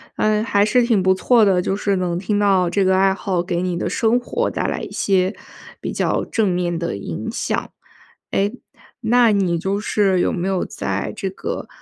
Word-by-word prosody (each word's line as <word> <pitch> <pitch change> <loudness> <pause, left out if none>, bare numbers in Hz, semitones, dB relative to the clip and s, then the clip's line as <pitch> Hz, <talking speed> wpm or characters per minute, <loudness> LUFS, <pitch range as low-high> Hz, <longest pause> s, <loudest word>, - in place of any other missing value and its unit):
哎， 215 0 +1
还 205 -2 +2
是 240 +4 +3
挺 225 -5 +2
不 190 0 +4
错 230 +4 +3
的， 190 -3 +3
就 190 - -1
是 200 0 0
能 175 -2 -1
听 205 +3 -1
到 190 -3 +3
这 195 +2 +1
个 185 0 +3
爱 195 0 +4
好 185 -2 -2
给 175 -1 -2
你 180 -1 -1
的 - - -2
生 235 -1 +2
活 245 - -2
带 - - -3
来 - - -2
一 - - -6
些 190 0 +1 0.5
比 - - -3
较 - - 0
正 220 -3 0
面 175 -1 -1
的 170 - -3
影 85 -5 -5
响。 - - -3 0.6
哎， 200 +1 +1 0.5
那 235 0 +4
你 180 -4 +1
就 195 +4 -1
是 195 -3 +1
有 - - +1
没 175 +1 -2
有 190 -2 0
在 - - -3
这 195 -3 -2
个 - - -5
195 Hz, 220 characters per minute, -20 LUFS, 180-210 Hz, 0.6 s, 不